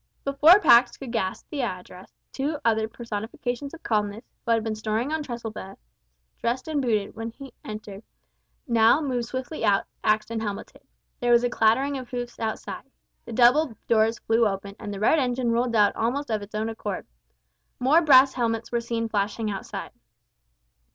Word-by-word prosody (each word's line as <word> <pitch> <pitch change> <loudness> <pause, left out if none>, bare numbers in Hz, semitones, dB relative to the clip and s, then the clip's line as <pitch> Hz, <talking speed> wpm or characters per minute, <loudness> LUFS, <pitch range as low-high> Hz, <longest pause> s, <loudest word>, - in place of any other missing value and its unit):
Before 295 +7 +6
Pax 240 -11 +5
could 265 -4 -7
gasp 190 -5 -2
the 290 - -2
address, 185 -4 -6 0.2
two 290 +3 -2
other 220 -1 +2
personifications 235 +4 -5
of 330 - -17
calmness, 210 0 -1 0.2
who - - -7
had 225 -1 +3
been 220 -1 -2
snoring 220 +6 -2
on 315 - -1
trestle 235 -5 -5
beds, 195 -2 -9 0.6
dressed 245 +4 -2
and 305 -3 0
booted, 215 -6 -1
when 225 +1 -5
he 270 +3 -12
entered, 210 -2 -8 0.7
now 230 +2 +5
moved 255 -6 -2
swiftly 260 +3 -5
out, 200 -2 +3 0.2
axed 215 +1 +1
and 225 -1 -2
helmeted. 205 -2 -6 0.4
There 240 0 +1
was 235 0 +5
a 245 - 0
clattering 265 +6 +2
of 255 - -10
hoofs 245 -1 -5
outside. 220 0 -5 0.4
The 235 - -8
double 250 +2 +4
doors 225 0 +3
flew 225 0 +2
open, 200 0 -5
and 205 - -6
the 200 - -5
red 265 +9 +4
engine 245 -2 0
rolled 235 0 0
out 205 -2 +4
almost 250 +4 -1
of 215 -1 0
its 205 +1 -10
own 220 +1 -1
accord. 210 -4 -5 0.7
More 280 +7 +4
brass 270 -4 +6
helmets 230 -2 -2
were 235 -1 0
seen 230 -1 -2
flashing 210 +1 -1
outside. 195 - -6
230 Hz, 175 wpm, -25 LUFS, 215-255 Hz, 0.7 s, Before